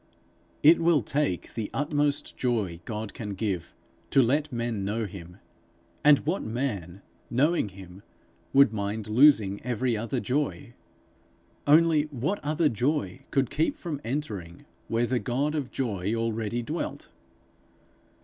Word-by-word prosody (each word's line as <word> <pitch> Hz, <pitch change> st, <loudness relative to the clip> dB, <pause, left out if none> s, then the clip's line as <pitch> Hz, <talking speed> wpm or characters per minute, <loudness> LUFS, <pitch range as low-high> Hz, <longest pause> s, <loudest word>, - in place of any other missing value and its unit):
It 160 Hz, +3 st, +7 dB
will 165 Hz, -6 st, +3 dB
take 140 Hz, -, -1 dB
the 110 Hz, -3 st, -3 dB
utmost 145 Hz, 0 st, 0 dB
joy 105 Hz, -9 st, -1 dB
God 110 Hz, -1 st, -5 dB
can 105 Hz, -3 st, -5 dB
give, 95 Hz, -4 st, -2 dB, 0.4 s
to 135 Hz, -, +5 dB
let 145 Hz, +5 st, +1 dB
men 115 Hz, -4 st, -2 dB
know 110 Hz, +3 st, -1 dB
him; 90 Hz, -2 st, -10 dB, 0.7 s
and 150 Hz, -1 st, +8 dB
what 170 Hz, +6 st, 0 dB
man, 105 Hz, -6 st, -4 dB, 0.3 s
knowing 140 Hz, -1 st, +2 dB
him, 95 Hz, 0 st, -12 dB, 0.5 s
would 140 Hz, -5 st, +6 dB
mind 105 Hz, +1 st, -3 dB
losing 110 Hz, -4 st, +5 dB
every 125 Hz, 0 st, 0 dB
other 115 Hz, +4 st, -2 dB
joy? 130 Hz, -8 st, -2 dB, 0.9 s
Only 155 Hz, 0 st, +5 dB
what 150 Hz, -, -2 dB
other 155 Hz, +2 st, +2 dB
joy 120 Hz, -5 st, -1 dB
could 135 Hz, -3 st, +1 dB
keep 160 Hz, +2 st, +1 dB
from 150 Hz, -5 st, -5 dB
entering, 105 Hz, -, -4 dB, 0.2 s
where 115 Hz, +1 st, +1 dB
the 125 Hz, +1 st, 0 dB
God 135 Hz, +5 st, -1 dB
of 145 Hz, -5 st, -2 dB
joy 105 Hz, -6 st, -2 dB
already 115 Hz, +1 st, -2 dB
dwelt? 155 Hz, +7 st, -4 dB
120 Hz, 130 wpm, -27 LUFS, 105-145 Hz, 0.9 s, and